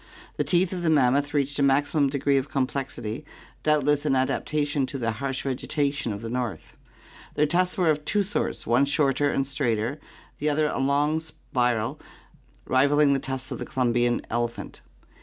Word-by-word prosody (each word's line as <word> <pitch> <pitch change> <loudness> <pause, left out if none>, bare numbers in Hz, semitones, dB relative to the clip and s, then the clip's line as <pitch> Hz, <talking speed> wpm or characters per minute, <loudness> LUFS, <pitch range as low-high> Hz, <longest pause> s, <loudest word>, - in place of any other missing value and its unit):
The - - +1
teeth 180 +1 +1
of 180 - -3
the 170 - +1
mammoth 140 -1 +3
reached 140 0 0
a - - +2
maximum 140 +1 +3
degree 140 0 +1
of 135 +2 -6
complexity, 130 -3 -3 0.4
doubt 150 -2 +2
less 145 0 +2
an 145 -3 +2
adaptation 145 +1 0
to 140 - -5
the 115 -3 -1
harsh 135 +3 -3
vegetation 140 -1 -1
of 100 +2 -6
the 115 - -4
north. 125 -4 -4 0.6
Their 150 - +3
tusks 180 +4 +1
were 175 -4 +4
of 150 0 -2
two 205 +6 +1
sorts, 200 +2 -3
one 120 +4 +3
shorter 145 0 +2
and 135 - 0
straighter, 130 -1 -1 0.4
the 150 - +1
other 150 +1 +2
a - - -2
long 145 +3 +2
spiral 125 -7 -2 0.7
rivalling 140 +2 +4
the 135 - +1
tusks 130 -1 -4
of - - -4
the - - -4
Columbian 120 -1 +1
elephant. 120 0 -3
140 Hz, 175 wpm, -25 LUFS, 130-150 Hz, 0.7 s, were